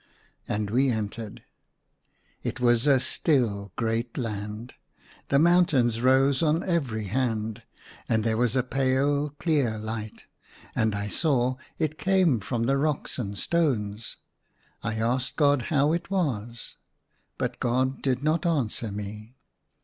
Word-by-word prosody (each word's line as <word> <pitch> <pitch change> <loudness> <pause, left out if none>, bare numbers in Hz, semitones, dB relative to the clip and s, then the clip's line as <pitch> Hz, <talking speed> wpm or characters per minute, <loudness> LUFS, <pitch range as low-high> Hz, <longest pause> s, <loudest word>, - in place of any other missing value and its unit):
And 105 -1 -2
we 130 +4 +3
entered. 110 -1 -4 1.0
It - - -4
was 120 +1 +3
a 135 -2 +6
still 115 - +1
great 115 +1 -2
land. 105 0 -4 0.5
The 140 - +3
mountains 145 -8 +3
rose 130 +2 +4
on 160 +1 +2
every 135 - -1
hand, 110 0 -2 0.5
and 110 -1 +2
there 110 -1 +1
was 120 +1 +1
a 130 - +2
pale 135 +3 +1
clear 145 -6 0
light; 110 0 -6 0.5
and 110 -1 +1
I 100 0 -3
saw 130 0 +1 0.2
it 155 0 -2
came 185 - +3
from 115 +3 -2
the 135 +3 +2
rocks 150 -2 -1
and 100 -4 -4
stones. 115 - -1 0.6
I 110 0 -2
asked 125 +3 -1
God 145 -3 +3
how 150 -1 +3
it 170 +2 -3
was. 120 - -2 0.6
But - - -3
God 130 +2 0
did 130 0 0
not 155 +1 +1
answer 125 -9 -1
me. 105 +4 -7
125 Hz, 135 wpm, -26 LUFS, 110-145 Hz, 1.0 s, a